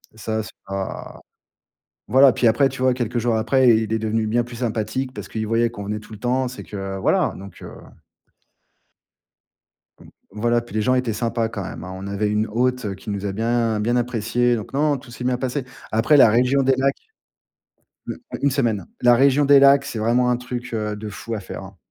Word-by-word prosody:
Ça, 110 0 -3
c'est 110 - -8 0.2
pas 95 0 -6 0.9
voilà, 135 +1 +7
puis 120 - +2
après, 120 +5 +4
tu 130 -1 -8
vois, 130 -1 +3
quelques 120 -1 -2
jours 115 -1 +1
après, 130 +3 +3
il 110 -1 -2
est 110 - 0
devenu 110 0 -1
bien 120 +2 +1
plus 120 0 -10
sympathique 120 +3 -2
parce - - -8
qu'il 110 -1 -3
voyait 115 +1 +2
qu'on 110 -3 -8
venait 105 +1 -3
tout 110 - -16
le 110 - -8
temps, 125 +2 0
c'est 125 - -9
que 95 -1 -6
voilà. 95 - +1
Donc, 100 0 -12
heu. - - -8 2.6
Voilà. 120 +3 +1
Puis 120 -3 -13
les 110 - +1
gens 130 +3 +2
étaient 125 -3 0
sympas 115 +1 -1
quand 110 -3 -5
même, 85 - -7
hein. 90 - -7
On 95 +1 -7
avait 100 +1 -1
une 105 +1 0
hôte, 125 +2 0
heu, 100 - -3
qui 95 - -14
nous 100 0 -4
a 100 - -2
bien, 115 +1 0
bien 120 +3 +1
appréciés. 120 0 +1
Donc 110 +4 -8
non, 145 0 +2
tout 120 - -14
s'est 125 +1 -8
bien 125 -1 0
passé. 130 +1 -2 0.3
Après, 115 +7 +3
la 135 - +8
région 125 +5 +3
des 135 0 +3
lacs 135 +1 +1 1.1
U - - -5 0.2
u - - -3
une 140 - +3
semaine. 115 -9 0
La 120 0 +6
région 140 +3 +4
des 140 0 +6
lacs, 140 0 +6
c'est 115 - -5
vraiment 120 +3 +2
un 125 - +2
truc, 125 0 -6
heu, 105 -1 -2
de 105 +1 -7
fou 105 +3 -6
à 105 - -4
faire, 95 - -8
hein. 95 0 -13
115 Hz, 215 wpm, -22 LUFS, 110-125 Hz, 2.6 s, la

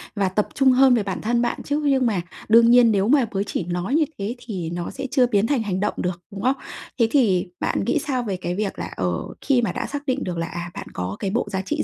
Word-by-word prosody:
và 195 -2 +1
tập 205 +3 0
trung 265 -1 +4
hơn 260 0 +6
về 225 - +1
bản 195 -2 -4
thân 235 +2 +1
bạn 240 0 -2
chứ! 290 +1 -1
Nhưng 270 -2 +3
mà 205 -6 +1 0.3
đương 230 +1 +7
nhiên 240 -2 +6
nếu 200 -1 +2
mà 270 0 +4
bới 195 0 -1
chỉ 200 - -3
nói 180 - -2
như 315 -1 +4
thế 205 +5 -3
thì 185 -8 -4
nó 175 0 -4
sẽ 270 0 -5
chưa 260 -3 +4
biến 210 -2 +2
thành 260 -4 +1
hành 190 -3 -2
động 210 +2 0
được, 180 -1 -3
đúng 195 -1 -7
không? 260 +4 +2 0.4
Thế 230 - +5
thì 205 -10 +3
bạn - - -1
nghĩ - - +1
sao 260 -5 -2
về 200 -5 -3
cái 175 0 -3
việc 205 0 -3
là, - - -5
ờ, 90 -1 0 0.3
khi 265 -4 +2
mà 225 -6 0
đã - - -3
xác 285 0 -5
định 270 0 -1
được 180 -2 -4
là, 165 0 -2
à, 175 +1 -6
bạn 200 - -7
có 90 +2 -4
cái 195 - -2
bộ 235 +1 0
giá 190 -1 -1
trị 300 +11 -2
215 Hz, 280 wpm, -23 LUFS, 185-255 Hz, 0.4 s, đương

